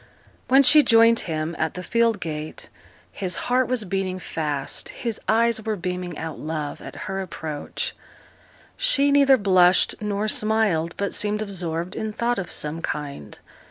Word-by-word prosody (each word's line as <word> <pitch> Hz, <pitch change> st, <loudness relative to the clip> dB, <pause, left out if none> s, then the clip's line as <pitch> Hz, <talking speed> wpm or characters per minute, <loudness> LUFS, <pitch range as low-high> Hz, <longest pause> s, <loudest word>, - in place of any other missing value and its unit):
When 270 Hz, +2 st, +6 dB
she 300 Hz, +3 st, +7 dB
joined 230 Hz, -3 st, +5 dB
him 155 Hz, +1 st, -2 dB
at 155 Hz, 0 st, -1 dB
the 180 Hz, -, -5 dB
field 230 Hz, +2 st, +1 dB
gate, 155 Hz, -2 st, -6 dB, 0.4 s
his 185 Hz, -2 st, -1 dB
heart 255 Hz, +1 st, +1 dB
was 250 Hz, -3 st, 0 dB
beating 190 Hz, -1 st, -2 dB
fast, 150 Hz, -6 st, -4 dB
his 230 Hz, -4 st, -4 dB
eyes 230 Hz, 0 st, +3 dB
were 220 Hz, 0 st, -1 dB
beaming 180 Hz, -2 st, -4 dB
out 160 Hz, -1 st, -6 dB
love 155 Hz, -2 st, -4 dB
at -, -, -9 dB
her 195 Hz, -1 st, -3 dB
approach. 155 Hz, -5 st, -5 dB, 0.8 s
She 290 Hz, -, +2 dB
neither 280 Hz, -1 st, +6 dB
blushed 185 Hz, -4 st, +4 dB
nor 210 Hz, 0 st, -1 dB
smiled, 210 Hz, -7 st, +1 dB
but 200 Hz, 0 st, -2 dB
seemed 210 Hz, +1 st, 0 dB
absorbed 175 Hz, -3 st, -4 dB
in 220 Hz, 0 st, -3 dB
thought 235 Hz, +2 st, -1 dB
of 185 Hz, -, -5 dB
some 155 Hz, +2 st, -4 dB
kind. 140 Hz, -, -5 dB
195 Hz, 155 wpm, -23 LUFS, 165-225 Hz, 0.8 s, she